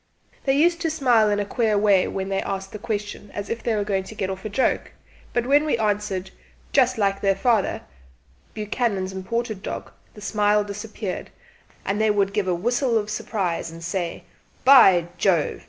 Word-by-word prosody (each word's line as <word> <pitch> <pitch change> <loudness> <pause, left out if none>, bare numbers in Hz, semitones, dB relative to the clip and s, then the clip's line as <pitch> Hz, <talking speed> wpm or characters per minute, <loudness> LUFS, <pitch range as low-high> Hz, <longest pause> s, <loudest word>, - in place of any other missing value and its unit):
They 270 0 +3
used 340 +3 +3
to 330 - +1
smile 245 -8 +3
in 205 0 +1
a 205 - -1
queer 220 0 +1
way 200 -2 +4
when 190 0 -4
they 195 0 0
asked 195 0 -4
the 210 - -7
question, 205 -1 -4
as 205 -1 -5
if 230 - -3
they 230 - 0
were 205 - 0
going 195 -2 -1
to 220 - -10
get 190 -2 -2
off 190 0 -7
a 215 - -4
joke; 255 +6 0 0.4
but 240 0 0
when 285 +3 +4
we 305 -5 +1
answered 205 -3 -1 0.4
"Just 255 -2 +3
like 195 -2 +1
their 195 -1 +2
fatherBuchanan's 190 - -3
imported 215 +2 -3
dog," - - -6 0.2
the 210 - -11
smile 210 0 +2
disappeared, 205 -1 -6 0.6
and 205 +2 0
they 220 - +3
would 200 -1 +1
give 200 -2 0
a 180 - +1
whistle 240 +5 +1
of 210 -1 -2
surprise 195 -6 -2
and 165 +1 -10
say 175 0 -3 0.4
"By 195 -11 +7
Jove!" 175 -6 +2
205 Hz, 185 wpm, -23 LUFS, 190-230 Hz, 0.6 s, By